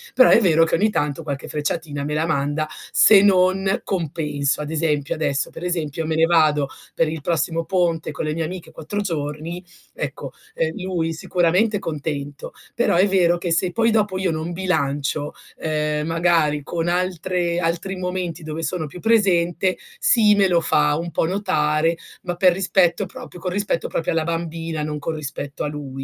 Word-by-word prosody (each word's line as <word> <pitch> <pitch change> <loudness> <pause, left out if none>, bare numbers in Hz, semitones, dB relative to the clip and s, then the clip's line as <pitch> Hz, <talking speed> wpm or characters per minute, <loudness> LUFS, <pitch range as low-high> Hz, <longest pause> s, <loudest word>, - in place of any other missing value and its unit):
Però 255 - +7
è - - +6
vero 165 -5 +4
che - - -5
ogni 210 +6 +2
tanto 150 -6 -1
qualche 140 -3 -5
frecciatina 150 -1 -3
me 150 +1 -3
la 155 +1 +1
manda 145 0 -1 0.2
se 205 -3 +8
non 190 0 +3
compenso. 150 -5 -1
Ad 150 +1 -5
esempio, 150 -3 0
adesso 140 -3 -1
per - - -9
esempio, 165 -3 -2
me 160 - -1
ne 160 +1 +4
vado 155 -4 +3 0.3
per 165 - +2
il 155 0 -4
prossimo 165 +1 0
ponte 170 -4 0
con 150 - -4
le 155 - -1
mie 165 +1 -2
amiche 175 +2 -7
4 205 +6 -5
giorni, 165 -1 -4 0.3
ecco, - - -5 0.2
ehm, - - -2
lui 175 -3 -2
sicuramente 180 +6 +1
contento, 145 -4 -5 0.2
però 240 - +1
è 185 +4 +4
vero 175 -3 +3
che 175 0 -3
se 175 +2 +2
poi 230 +5 +2
dopo 210 -3 +1
io 185 -2 0
non 160 +2 -4
bilancio, 150 -5 -1 0.3
ehm, 150 -1 -1
magari 165 -3 +1
con 165 +3 -3
altre 175 -1 -1
altri 175 +3 -2
momenti 180 -3 -4
dove 155 +1 -5
sono 160 0 0
più 165 +5 -10
presente, 185 -4 +2 0.2
sì, 230 - +5
me 200 -1 +4
lo 175 -2 +2
fa 150 -2 +3
un 170 +1 -4
po' - - 0
notare, 165 -4 +1 0.3
ma 175 -1 -3
per 180 0 +4
rispetto 190 0 +2
proprio 180 -1 -11
con 180 +1 -3
rispetto 200 -3 -1
proprio 165 - -2
alla 165 -1 0
bambina, 165 -1 -3
non 150 0 -3
con 160 +3 -3
rispetto 145 -1 -5
a - - -1
lui. 145 -2 -6
165 Hz, 180 wpm, -21 LUFS, 150-185 Hz, 0.3 s, se